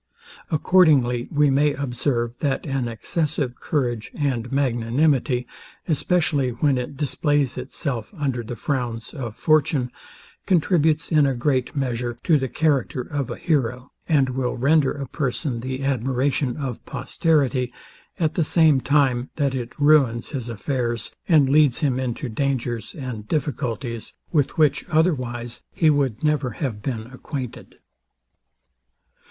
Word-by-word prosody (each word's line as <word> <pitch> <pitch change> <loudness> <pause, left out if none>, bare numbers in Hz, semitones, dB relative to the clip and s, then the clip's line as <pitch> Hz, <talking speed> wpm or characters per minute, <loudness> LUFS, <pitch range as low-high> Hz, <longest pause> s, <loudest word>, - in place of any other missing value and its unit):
Accordingly 145 -8 +3
we 145 -1 +3
may 145 +1 +3
observe, 120 -3 -1
that 140 -3 -1
an 135 -4 -1
excessive 130 - -2
courage 120 -7 -1
and 125 -5 -1
magnanimity, 130 0 +1 0.4
especially 155 -4 +1
when 135 +2 +1
it 125 +2 -6
displays 145 -1 +1
itself 125 -9 -4
under 135 -5 -1
the 120 +1 -6
frowns 120 -3 -3
of 120 -7 -5
fortune, 150 -5 +2 0.6
contributes 160 -3 +2
in 150 -3 +5
a 135 - 0
great 130 +1 0
measure, 120 -3 -2
to 155 -4 +4
the 130 - -1
character 140 -3 +1
of 140 0 -3
a 120 - -5
hero, 130 -6 -1 0.2
and 140 -5 +3
will 125 -1 -2
render 140 +2 +3
a 140 -2 -5
person 125 -2 -2
the 130 +2 -4
admiration 130 0 0
of 135 -5 -4
posterity; 135 -6 +1 0.5
at 160 -2 +1
the 170 - +1
same 155 -3 +4
time, 135 -3 +2
that 140 -3 0
it 125 +1 -5
ruins 140 -6 +4
his 125 -5 -4
affairs, 120 0 -2
and 155 -6 +5
leads 145 0 +4
him 130 -4 +1
into 130 +2 -3
dangers 120 -2 -2
and 125 -7 -6
difficulties, 125 -6 -3 0.2
with 145 -5 +1
which 155 -3 +3
otherwise 125 -8 0
he 160 -2 +3
would 135 -5 0
never 150 -4 +1
have 120 -9 -3
been 115 -2 -3
acquainted. 130 -2 -7
135 Hz, 135 wpm, -23 LUFS, 120-150 Hz, 0.6 s, in